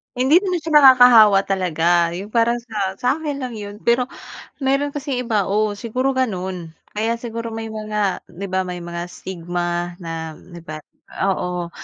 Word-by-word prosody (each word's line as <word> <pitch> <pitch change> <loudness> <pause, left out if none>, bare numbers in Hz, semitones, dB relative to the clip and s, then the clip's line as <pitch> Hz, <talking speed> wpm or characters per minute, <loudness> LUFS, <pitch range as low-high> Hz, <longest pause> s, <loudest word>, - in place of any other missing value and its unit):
Hindi 265 +8 +5
naman 365 -4 -2
siya 325 - -4
nakakahawa 245 -7 +8
talaga, 175 -2 +1
'yung 200 +4 -7
parang 235 0 +2
sa 200 -5 -3
sa 250 +2 -3
akin 290 -3 -4
lang 250 -2 -4
'yon. 205 -1 -7
Pero 245 +1 +2 0.5
meron 275 +1 +1
kasing 275 -3 -3
iba 215 -5 0
oo 210 +1 0
siguro 255 +5 -1
gano'n. 185 -9 -3 0.2
Kaya 225 +2 -1
siguro 230 -1 -6
may 225 0 -5
mga 215 -2 -2
'di 190 +3 -7
ba 185 0 0
may 180 -1 -5
mga 170 0 -5
stigma 175 -1 -4
na 160 -1 -5
'di 175 -1 -13
ba, 155 0 -7 0.5
oo. 180 -2 -2
210 Hz, 160 wpm, -20 LUFS, 180-245 Hz, 0.5 s, nakakahawa